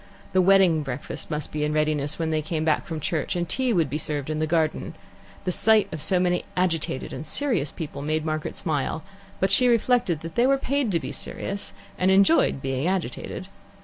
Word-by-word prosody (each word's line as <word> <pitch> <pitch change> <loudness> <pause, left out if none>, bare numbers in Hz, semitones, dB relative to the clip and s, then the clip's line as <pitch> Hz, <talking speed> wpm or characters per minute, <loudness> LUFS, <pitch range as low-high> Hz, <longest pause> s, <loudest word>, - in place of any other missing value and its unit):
The 185 - +5
wedding 185 -4 +5
breakfast 135 -2 -6
must 150 -2 -3
be 150 0 -2
in 150 0 0
readiness 150 -1 0
when 160 -1 -1
they 155 0 +1
came 155 +1 -2
back 155 -2 +1
from 160 -2 -4
church, 155 +3 -2
and 175 -1 -1
tea 260 +7 +1
would 170 -8 +2
be 145 +3 -3
served 150 -1 -3
in 155 - -2
the 155 - 0
garden. 160 -1 0 0.5
The 180 - 0
sight 215 +1 +4
of 155 - -4
so 185 +3 +3
many 180 -1 +1
agitated 165 -7 -1
and - - -5
serious 220 - -1
people 145 -4 -6
made 155 +2 -1
Margaret 155 -1 -2
smile, 155 -2 -2 0.4
but 190 0 +1
she 250 +6 +5
reflected 235 -8 +2
that 165 0 -7
they 240 +6 +3
were 275 0 +4
paid 270 -3 0
to 170 - +3
be - - -6
serious, 200 +1 -4 0.3
and 185 - +3
enjoyed 195 - +4
being 135 +3 -1
agitated. 185 0 -3
165 Hz, 205 wpm, -25 LUFS, 150-190 Hz, 0.5 s, The